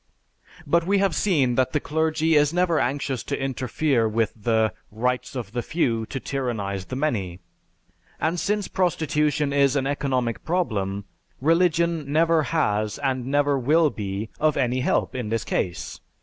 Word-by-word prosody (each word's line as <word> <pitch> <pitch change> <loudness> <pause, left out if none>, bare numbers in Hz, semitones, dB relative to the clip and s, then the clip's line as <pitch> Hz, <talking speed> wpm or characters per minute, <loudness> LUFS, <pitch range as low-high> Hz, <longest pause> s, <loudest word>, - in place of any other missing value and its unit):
But 170 +3 +2
we 200 +1 +3
have 195 -3 +2
seen 145 -12 +2
that 130 +1 +1
the 150 - +2
clergy 160 +2 0
is 150 -1 +4
never 175 -2 +2
anxious 135 -1 -1
to 140 - -3
interfere 130 -2 0
with 110 0 0
the 110 0 +1 0.2
"rights 125 +5 -2
of 115 -6 -5
the 120 - -2
few 115 -8 -1
to 135 - -4
tyrannize 110 -9 -3
the 130 - -6
many," 105 - -2 0.8
and 165 +3 0
since 205 +1 0
prostitution 150 -5 0
is 140 -1 +3
an 135 -2 +1
economic 135 -4 -1
problem, 100 - -1 0.3
religion 165 -1 +2
never 165 +1 +3
has, 105 -9 0
and 130 -3 -2
never 145 0 +2
will 150 +4 +3
be, 100 +1 -4
of 155 -1 +2
any 125 +1 +1
help 125 - 0
in 125 -4 -4
this 115 0 -1
case. 90 -1 -3
135 Hz, 155 wpm, -24 LUFS, 115-160 Hz, 0.8 s, is